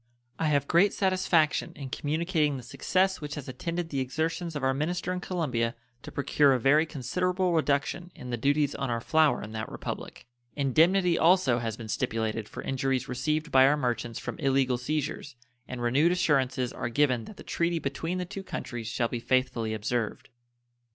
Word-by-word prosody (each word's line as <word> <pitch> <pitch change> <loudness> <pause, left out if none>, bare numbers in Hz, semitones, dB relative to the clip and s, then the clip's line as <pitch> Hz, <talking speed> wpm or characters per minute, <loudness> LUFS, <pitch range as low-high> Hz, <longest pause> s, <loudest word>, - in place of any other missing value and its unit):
I 160 - +1
have 145 -2 +2
great 195 +4 +4
satisfaction 185 -5 +2
in 135 -3 -7
communicating 155 -1 0
the 125 - -8
success 190 +10 0
which 150 0 -5
has 145 -3 -7
attended 170 +6 -4
the 140 - -2
exertions 160 +5 -2
of 145 - -3
our 130 0 +3
minister 175 +6 -2
in 180 - -3
Colombia 130 -11 -1 0.3
to - - -9
procure 140 0 +3
a 130 - +1
very 150 +6 +4
considerable 180 +6 -1
reduction 160 +3 0
in 125 - -8
the - - 0
duties 145 +4 +1
on 135 - -3
our 115 -1 0
flour 155 +5 +2
in 105 - -8
that 110 0 -5
Republic. - - -6 0.3
Indemnity 170 +6 +3
also 165 -8 +4
has 115 -2 -3
been 115 - -8
stipulated 110 0 -2
for - - -7
injuries 135 -1 -1
received 150 +5 -1
by 130 0 +7
our 150 +2 +3
merchants 120 -4 -2
from - - -6
illegal 135 -3 +2
seizures, 145 0 -3 0.3
and 125 -1 -5
renewed 140 +8 +3
assurances 135 -8 +1
are - - -3
given 125 -2 +2
that 210 - -11
the - - -10
treaty 170 0 0
between 165 +4 -3
the 180 - -2
two 195 +2 -7
countries 120 - -6
shall 115 +1 0
be 120 - -4
faithfully 125 -2 0
observed. 110 +1 -2
140 Hz, 180 wpm, -28 LUFS, 125-165 Hz, 0.3 s, by